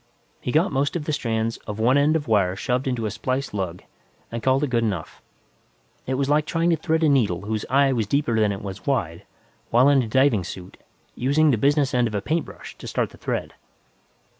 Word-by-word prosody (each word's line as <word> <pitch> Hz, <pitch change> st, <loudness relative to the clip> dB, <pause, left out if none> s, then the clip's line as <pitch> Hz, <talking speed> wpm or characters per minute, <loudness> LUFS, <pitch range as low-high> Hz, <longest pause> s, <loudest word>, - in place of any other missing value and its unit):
He 125 Hz, -, -3 dB
got 160 Hz, +6 st, +2 dB
most 140 Hz, +3 st, 0 dB
of 160 Hz, -4 st, -3 dB
the 155 Hz, -, -1 dB
strands 115 Hz, -4 st, -1 dB
of 105 Hz, -1 st, -5 dB
one 120 Hz, +4 st, +3 dB
end 145 Hz, +2 st, +3 dB
of 150 Hz, -4 st, -1 dB
wire 100 Hz, -5 st, +2 dB
shoved 125 Hz, +6 st, -1 dB
into 125 Hz, -4 st, -1 dB
a 105 Hz, -, -2 dB
splice 130 Hz, +5 st, -3 dB
lug, 90 Hz, -3 st, -4 dB, 0.5 s
and 115 Hz, 0 st, -4 dB
called 130 Hz, +3 st, +2 dB
it 145 Hz, -, -1 dB
good 115 Hz, -1 st, +2 dB
enough. 100 Hz, -8 st, -4 dB, 0.9 s
It 130 Hz, -, 0 dB
was 135 Hz, +1 st, 0 dB
like 150 Hz, +1 st, +2 dB
trying 170 Hz, +1 st, +1 dB
to -, -, +4 dB
thread 160 Hz, +1 st, 0 dB
a -, -, +5 dB
needle 115 Hz, -, +2 dB
whose 110 Hz, +1 st, -3 dB
eye 135 Hz, +1 st, +3 dB
was 115 Hz, -5 st, -1 dB
deeper 120 Hz, -3 st, +1 dB
than 105 Hz, -1 st, +3 dB
it 100 Hz, -, -6 dB
was 100 Hz, -1 st, -8 dB
wide, 95 Hz, -12 st, -1 dB, 0.4 s
while 125 Hz, +4 st, +5 dB
in 140 Hz, -2 st, +4 dB
a 120 Hz, -, -3 dB
diving 130 Hz, -3 st, +3 dB
suit, 90 Hz, +1 st, -9 dB, 0.4 s
using 145 Hz, +4 st, +2 dB
the -, -, +3 dB
business 145 Hz, +2 st, +2 dB
end 125 Hz, -1 st, +2 dB
of 110 Hz, -, -5 dB
a -, -, +1 dB
paintbrush 165 Hz, +2 st, -4 dB
to -, -, -8 dB
start -, -, -1 dB
the -, -, -16 dB
thread. -, -, -3 dB
125 Hz, 220 wpm, -23 LUFS, 110-145 Hz, 0.9 s, a